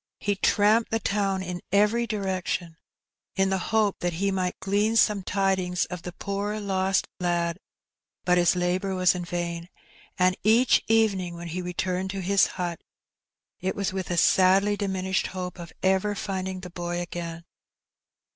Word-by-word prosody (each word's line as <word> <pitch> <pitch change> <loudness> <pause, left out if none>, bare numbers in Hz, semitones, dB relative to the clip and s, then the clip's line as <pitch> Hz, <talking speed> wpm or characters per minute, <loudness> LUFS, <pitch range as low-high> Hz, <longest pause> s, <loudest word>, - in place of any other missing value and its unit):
He 205 - 0
tramped 210 +3 +3
the 225 - +1
town 195 -3 0
in 175 -1 -5
every 210 +4 +3
direction, 185 -5 -2 0.6
in 195 0 +2
the 190 - +1
hope 215 -3 +2
that 175 -1 -1
he 195 +4 0
might 185 -1 -2
glean 205 +3 +1
some 210 -3 +4
tidings 185 -2 0
of 180 -1 -5
the 180 - -6
poor 200 +3 -3
lost 190 -1 +1
lad; 175 -1 0 0.7
but 180 0 +4
his 175 +1 +4
labour 180 +2 0
was 185 -1 +4
in 180 -1 -4
vain, 170 0 -4 0.5
and 185 0 +3
each 230 +4 +4
evening 200 -6 +2
when 170 0 -7
he 180 +3 -3
returned 180 +1 -2
to 195 0 -4
his 195 +2 +3
hut 175 -2 -3 0.8
it 190 +1 -2
was 200 -2 -2
with 190 -1 -4
a 175 - -1
sadly 190 +4 +4
diminished 190 -2 -1
hope 180 -1 -6
of 170 -1 -8
ever 190 +2 +2
finding 190 -2 -4
the 180 -2 -9
boy 175 0 -3
again. 170 -1 -6
190 Hz, 160 wpm, -26 LUFS, 180-200 Hz, 0.8 s, some